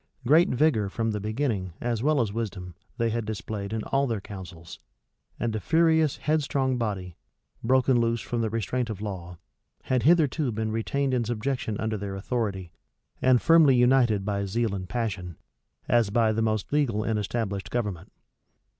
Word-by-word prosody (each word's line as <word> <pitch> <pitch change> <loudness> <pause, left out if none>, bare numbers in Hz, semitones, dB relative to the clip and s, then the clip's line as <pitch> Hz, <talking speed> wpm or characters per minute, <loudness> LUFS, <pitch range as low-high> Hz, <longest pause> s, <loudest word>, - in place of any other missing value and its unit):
Great 155 +7 +5
vigor, 125 -7 +2
from 115 +2 -1
the 105 - -2
beginning, 105 - -2
as 120 -2 -2
well 150 +2 +2
as 105 -4 -2
wisdom, 100 -6 -4 0.2
they 115 -1 +1
had 115 +1 -1
displayed 105 -1 -5
in 110 -1 -2
all 135 0 +1
their 115 -4 -1
counsels; 90 -4 -10 0.6
and 115 -2 -1
a - - -1
furious, 160 - +3
headstrong 140 -4 0
body, 95 -6 -3 0.5
broken 130 +1 +3
loose 115 0 +1
from 120 +1 -3
the 110 - 0
restraint 115 +3 -2
of 105 -3 -5
law, 90 -4 -6 0.5
had 130 -2 +1
hitherto 155 -3 +3
been 110 0 -2
retained 130 +5 -1
in 125 -2 +1
subjection 120 0 -2
under 110 -1 -1
their 100 -1 -5
authority, 95 -4 -3 0.5
and 130 -2 +4
firmly 165 -5 +6
united 120 -5 +3
by 100 -1 -1
zeal 110 +2 -1
and 95 -2 -5
passion, 100 -8 -3 0.5
as 120 -4 +3
by 110 +1 +2
the 110 +1 0
most 110 +2 -1
legal 120 -8 +1
and 110 -1 0
established 100 -2 -3
government. 100 -7 -3
115 Hz, 165 wpm, -26 LUFS, 100-130 Hz, 0.6 s, firmly